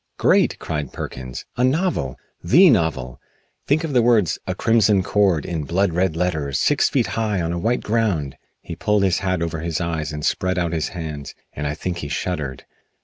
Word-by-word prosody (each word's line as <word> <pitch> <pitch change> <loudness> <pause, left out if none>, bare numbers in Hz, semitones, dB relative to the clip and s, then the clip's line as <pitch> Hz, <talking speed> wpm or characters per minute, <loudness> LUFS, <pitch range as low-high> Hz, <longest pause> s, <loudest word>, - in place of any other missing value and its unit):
"Great!" - - +3
cried 75 -4 -4
Perkins. 65 -1 -7
"A 125 - +2
novel! 130 - 0 0.3
The 165 - +6
novel! 80 - 0 0.5
Think 150 +3 +2
of 155 -3 -3
the 125 - +5
words 115 -8 +3
'A - - -2
Crimson 110 -4 +3
Cord' 95 -6 +2
in 80 -3 -3
blood 90 +4 0
red 90 -1 +1
letters 80 -6 -1
six - - +2
feet - - +1
high 110 -4 -1
on 85 0 -1
a 85 - -2
white 120 +8 0
ground!" 105 - 0 0.3
He 85 - -7
pulled 105 +3 +1
his 95 -2 +2
hat 90 -3 -1
over 80 -1 -3
his 80 0 -2
eyes 80 -3 -2
and 75 0 -4
spread 95 0 0
out 85 -2 0
his 80 -2 -1
hands, 75 -4 -6 0.2
and 75 0 -3
I 75 - -2
think 90 +2 -4
he 75 - -5
shuddered. 75 -4 -3
85 Hz, 195 wpm, -21 LUFS, 75-105 Hz, 0.5 s, The